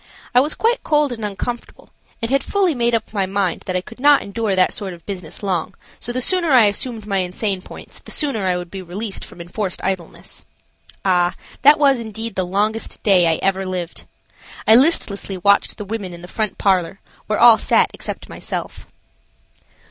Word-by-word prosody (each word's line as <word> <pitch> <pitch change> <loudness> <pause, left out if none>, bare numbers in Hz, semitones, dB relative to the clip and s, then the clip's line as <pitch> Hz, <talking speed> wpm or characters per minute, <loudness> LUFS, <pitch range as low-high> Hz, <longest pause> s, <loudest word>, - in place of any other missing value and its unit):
I 245 - +6
was 295 +4 +2
quite 470 +2 +1
cold 300 -3 +2
and 225 -2 -6
uncomfortable, 225 +4 -6 0.3
and 230 - -1
had 275 0 +2
fully 390 -4 +1
made 235 -2 +1
up 225 - -4
my 195 -3 0
mind 195 -2 -1
that 185 - -2
I 180 - +1
could 230 +5 -13
not 290 +1 +5
endure 205 -1 -2
that 185 -1 +3
sort 195 -4 -4
of 170 - -20
business 185 -2 -7
long, 190 -1 -2 0.2
so 240 - -3
the 255 +1 -2
sooner 355 +4 +2
I 240 -4 +7
assumed 220 +1 -2
my 200 -2 0
insane 185 +1 -2
points - - -12
the - - -14
sooner 245 -11 -1
I 180 -1 +1
would 175 -1 -7
be 195 - -6
released 195 +4 -5
from - - -12
enforced 180 +2 -4
idleness. 185 -3 -5 0.6
Ah! 180 -2 +2 0.3
that 290 +3 +7
was 275 -4 +4
indeed 225 0 -5
the 185 - -1
longest 210 +4 -1
day 185 -4 +5
I 165 - +3
had - - -8
ever 195 0 +1
lived. 180 -3 -4 0.6
I 220 - +8
listlessly 225 - +3
watched 200 +3 +2
the 210 - -6
women 200 -4 -5
in 170 - -13
the - - -8
front 215 +1 -3
parlor, 190 -1 +1 0.3
where 215 - 0
all 235 -2 +8
sat - - +3
except - - -7
myself. - - -6
205 Hz, 195 wpm, -20 LUFS, 185-240 Hz, 0.6 s, I